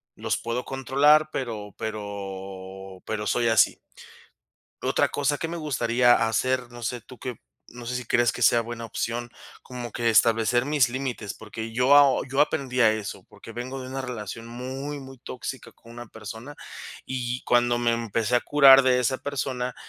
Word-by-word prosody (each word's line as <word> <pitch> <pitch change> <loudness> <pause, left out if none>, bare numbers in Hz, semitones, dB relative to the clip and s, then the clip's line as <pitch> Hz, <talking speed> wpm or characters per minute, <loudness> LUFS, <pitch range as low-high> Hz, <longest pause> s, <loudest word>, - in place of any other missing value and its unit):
los - - -1
puedo 120 +2 -3
controlar, 145 +3 +3
pero 110 -6 -5
pero 95 -2 -7
pero 105 -1 -3
soy 120 -1 +2
así". 110 -3 +4 1.1
Otra - - +2
cosa 145 0 0
que 165 - -3
me 170 - -4
gustaría 120 -5 +3
hacer, 125 +2 0
no 120 -1 -10
sé 120 +1 -3
tú 125 - -14
que 130 - -4
op 120 - -13 0.3
no 120 0 -10
sé 125 +1 -3
si 125 - -4
crees 120 -2 +3
que - - -8
sea 120 - +5
buena 115 0 -7
opción, 120 +1 -3 0.3
como 120 -2 -7
que 115 +1 0
establecer 115 +2 +3
mis 145 -4 +3
límites, 125 -5 -4
porque 110 +1 -7
yo 125 +4 +3
aho 140 -2 +6
yo 135 +2 +1
aprendí 135 -4 0
a 110 -2 +6
eso, 110 -2 -5
porque - - -13
vengo 130 +3 -6
de 130 - -7
una 135 +1 -4
relación 115 -2 -6
muy, 135 +4 -6
muy 135 -1 -12
tóxica 125 +2 -7
con 115 - -17
una 120 -1 -9
persona, 110 +6 -9 0.5
y 125 -1 -3
cuando 120 0 +3
me 120 -1 +1
empecé 115 +1 0
a - - +5
curar 135 0 +7
de 130 -1 +3
esa 130 +1 0
persona, 130 -3 -3
120 Hz, 180 wpm, -25 LUFS, 115-130 Hz, 1.1 s, curar